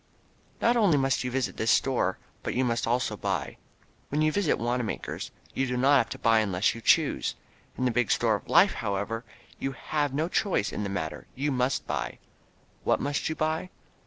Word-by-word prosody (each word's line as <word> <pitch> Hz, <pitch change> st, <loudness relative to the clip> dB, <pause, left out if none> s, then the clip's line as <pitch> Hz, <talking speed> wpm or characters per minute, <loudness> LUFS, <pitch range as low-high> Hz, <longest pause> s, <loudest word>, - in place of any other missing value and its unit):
Not 235 Hz, +1 st, +4 dB
only 200 Hz, -10 st, +4 dB
must 135 Hz, -1 st, +1 dB
you 125 Hz, -, -2 dB
visit 125 Hz, -7 st, -2 dB
this 110 Hz, -, 0 dB
store 120 Hz, -9 st, +2 dB, 0.2 s
but -, -, -3 dB
you 130 Hz, +1 st, +2 dB
must 115 Hz, -1 st, 0 dB
also 125 Hz, +2 st, 0 dB
buy. -, -, -3 dB, 0.5 s
When 150 Hz, +2 st, +1 dB
you 155 Hz, -, +3 dB
visit 200 Hz, -2 st, +1 dB
Wanamaker's 120 Hz, -1 st, -3 dB, 0.2 s
you 135 Hz, -, 0 dB
do 125 Hz, 0 st, -1 dB
not 140 Hz, +3 st, +5 dB
have 115 Hz, -, 0 dB
to -, -, -5 dB
buy 115 Hz, -1 st, +4 dB
unless 100 Hz, -3 st, +1 dB
you 115 Hz, -, -9 dB
choose. -, -, +2 dB, 0.4 s
In 130 Hz, -, 0 dB
the 125 Hz, -, +3 dB
big 120 Hz, -1 st, +1 dB
store 115 Hz, -2 st, +3 dB
of 105 Hz, -, -4 dB
Life, 195 Hz, -, +6 dB
however, 110 Hz, +1 st, -2 dB, 0.4 s
you 135 Hz, -, -2 dB
have 145 Hz, +2 st, -1 dB
no 155 Hz, +4 st, 0 dB
choice 180 Hz, -, 0 dB
in -, -, -3 dB
the 100 Hz, -, -2 dB
matter, 80 Hz, -6 st, -4 dB
you 145 Hz, +3 st, -1 dB
must 130 Hz, +1 st, 0 dB
buy. -, -, -3 dB, 0.7 s
What -, -, +2 dB
must 145 Hz, +2 st, -1 dB
you 160 Hz, -, -2 dB
buy? 155 Hz, +4 st, -1 dB
125 Hz, 195 wpm, -28 LUFS, 115-145 Hz, 0.7 s, Life